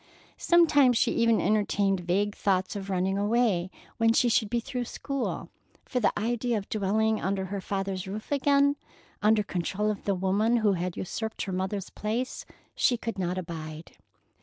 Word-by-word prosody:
Sometimes 290 -8 +5
she - - +2
even 230 -1 +3
entertained 200 -2 +1
vague 195 +4 0
thoughts 190 -2 0
of 200 -1 -5
running 190 +1 0
away 205 -4 +1 0.3
when 225 0 +4
she 245 +1 +3
should 220 -2 +2
be 240 +1 +1
through 250 0 -4
school, 275 +2 -4 0.4
for 250 - -1
the 225 - +3
idea 235 +2 0
of 200 - -5
dwelling 220 +1 +1
under 190 +1 -1
her 200 - -3
father's 195 -1 -3
roof 210 +6 -7
again, 285 0 +3 0.4
under 215 0 +4
control 200 +3 -1
of 210 - -7
the 200 - +1
woman 200 +6 +2
who 215 -3 +3
had 180 -1 -3
usurped 220 +4 -4
her 195 - -4
mother's 190 +1 -3
place, 230 +4 -3 0.3
she 245 - +2
could 230 -3 -5
not 180 0 -1
abide. 160 -2 -7
210 Hz, 165 wpm, -28 LUFS, 190-230 Hz, 0.4 s, Sometimes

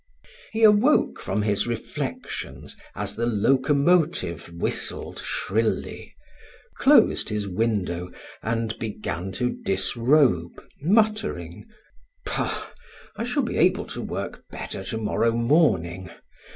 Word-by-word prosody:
He 225 +1 -1
awoke 215 +7 +5
from 100 +3 -1
his 105 +1 +1
reflections 120 -1 -5 0.2
as - - -4
the 115 +1 -1
locomotive 135 - +2
whistled 85 0 -2
shrilly, 110 +3 -2 0.6
closed - - +5
his 105 -1 -2
window, 90 -3 -1 0.3
and 115 0 -1
began 100 -4 -4
to 125 +5 0
disrobe, 115 - +2 0.2
muttering: 215 +5 0 0.6
"Bah, - - -2 0.4
I - - -3
shall 250 +4 0
be 235 - -3
able 180 +3 +3
to - - -5
work - - -5
better 95 - -6
to 110 - -3
morrow 115 +1 +1
morning. 95 - +2
115 Hz, 105 wpm, -25 LUFS, 95-155 Hz, 0.6 s, awoke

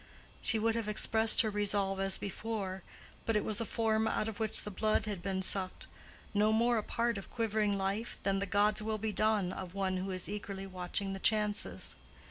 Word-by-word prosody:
She 225 - +2
would 225 +1 +2
have 225 -2 -2
expressed 220 +2 +6
her 220 -3 -1
resolve 200 -2 +1
as 195 0 +1
before; 200 -1 -4 0.5
but 225 - +2
it 210 - +1
was 215 0 +1
a - - -1
form 220 0 +1
out 215 - 0
of 220 -2 -6
which 220 -1 -2
the 210 - -6
blood 215 +3 +1
had 205 -4 -4
been 190 +1 -2
sucked—no 205 +2 -2
more 235 +1 +3
a - - -4
part 235 -1 -1
of 195 - -11
quivering 215 -3 0
life 195 +4 -2
than 195 0 +1
the 200 - -2
"God's 205 +2 +2
will 215 0 -2
be 215 0 -2
done" 210 -2 +2
of 185 -1 -7
one 190 -1 0
who 190 +1 -3
is 185 -2 -2
eagerly 200 -1 -5
watching 190 +1 -3
chances. 210 0 0
210 Hz, 195 wpm, -33 LUFS, 195-220 Hz, 0.5 s, expressed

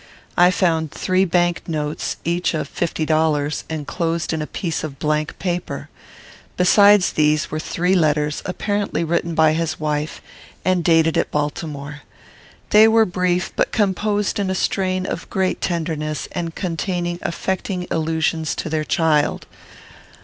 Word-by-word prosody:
I 175 +1 +6
found 165 -4 +1
three 185 0 +1
bank 175 -1 +1
notes, 150 -1 -2
each 170 +1 0
of 155 - -2
fifty 165 -2 -2
dollars, 155 -2 +1
enclosed 165 +2 -2
in 160 - -2
a 150 - -4
piece 170 -4 -3
of 145 -3 -5
blank 150 +1 -1
paper. 175 -2 -3 0.7
Besides 200 +1 +6
these 150 0 +2
were 155 - -2
three 180 +3 0
letters, 150 -4 +1
apparently 205 -1 -1
written 170 0 -1
by 160 -1 +4
his 160 -1 -2
wife, 150 0 -2 0.5
and 185 -2 +2
dated 165 -1 +3
at - - 0
Baltimore. 150 -1 -4 0.7
They 215 +1 +8
were 225 0 +5
brief, 180 -1 -1
but - - +1
composed 205 0 0
in 195 -2 0
a 190 - 0
strain 185 0 0
of - - -5
great 190 -1 -1
tenderness, 155 -3 -2
and 170 -2 -4
containing 175 -1 -2
affecting 185 +1 -2
allusions 160 -1 0
to - - -4
their 155 -1 0
child. 155 -2 +1
165 Hz, 140 wpm, -21 LUFS, 155-185 Hz, 0.7 s, They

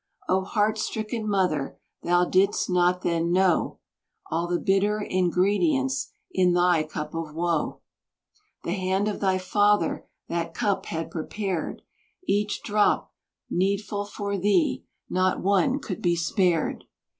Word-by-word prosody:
Oh! 190 +1 +2
heart 210 +2 0
stricken 215 0 -3
mother, 180 -8 0 0.2
thou 175 +1 +3
didst 195 +3 +2
not 180 0 +2
then 170 0 0
know 185 -1 +2 0.5
All 170 +1 0
the 175 0 0
bitter 200 +2 +2
ingredients 180 -8 +1 0.2
in 180 -1 +3
thy 175 -2 +4
cup 150 0 -5
of 165 -2 -5
woe. 170 -1 -1 0.8
The - - -3
hand 190 +1 0
of 210 - -2
thy 190 -1 +2
father 205 +3 +1 0.2
that 170 0 -3
cup 205 -4 0
had 165 0 -4
prepared, 180 +1 -3 0.4
Each 205 +1 0
drop 210 -1 +1 0.3
needful 200 +2 -1
for 200 -1 -4
thee, 210 - +2 0.2
not 185 0 +1
one 200 +8 +3
could 190 - -6
be 175 -1 +2
spared. 170 -1 0
185 Hz, 130 wpm, -26 LUFS, 175-205 Hz, 0.8 s, thy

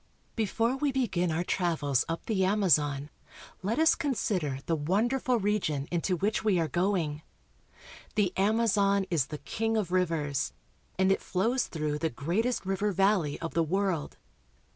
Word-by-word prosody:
BEFORE 230 +3 0
we 285 0 +1
begin 190 -10 0
our 165 +2 0
travels 160 -8 0
up 165 - -3
the 200 -4 +1
Amazon 150 -8 +2 0.5
let 210 +6 -1
us 320 0 +5
consider 200 - -1
the 165 - +1
wonderful 235 - +1
region 190 -9 -1
into 175 +2 0
which 205 +6 -1
we 205 -5 +3
are 165 - +1
going. 170 -2 0 0.9
The 195 -4 +2
Amazon 200 -1 +2
is 150 -6 +1
the 150 - -6
king 225 +7 -2
of 200 -5 -1
rivers, 160 -7 0 0.4
and 190 +1 +3
it 195 - +1
flows 230 +8 0
through 150 -2 -2
the 160 - 0
greatest 190 - -1
river 195 +2 0
valley 195 -6 +1
of 165 - -4
the 165 - +2
world. 180 -1 -1
190 Hz, 150 wpm, -29 LUFS, 160-215 Hz, 0.9 s, us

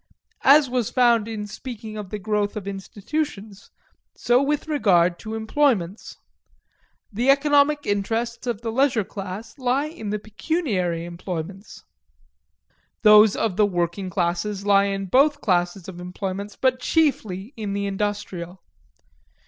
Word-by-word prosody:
As 285 +1 +7
was 245 -3 -1
found 235 -3 +3
in 215 -2 -4
speaking 220 0 -8
of 210 -3 -6
the 210 - -4
growth 205 0 -1
of 200 -2 -6
institutions, 205 +2 -5 0.5
so 245 +2 +2
with 295 +2 -1
regard 180 - +3
to 220 0 -6
employments. 220 - 0 1.0
The 240 +6 0
economic 290 +1 +4
interests 225 +4 -2
of 235 -3 -2
the 230 -1 -3
leisure 250 -2 +2
class 200 +7 -8
lie 260 +3 +1
in 305 -9 -7
the 210 - -1
pecuniary 210 - -2
employments; 175 +2 -7 1.2
those 210 -1 +7
of 205 -5 -1
the 210 - +5
working 175 +1 -2
classes 185 +3 -2
lie 200 -1 +5
in 195 -1 -2
both 285 +9 +3
classes 180 - 0
of 180 -2 -8
employments, 190 +3 -5
but 255 -1 +1
chiefly 235 - 0
in 210 -3 -4
the 200 0 -2
industrial. 195 -3 -4
210 Hz, 130 wpm, -23 LUFS, 195-250 Hz, 1.2 s, As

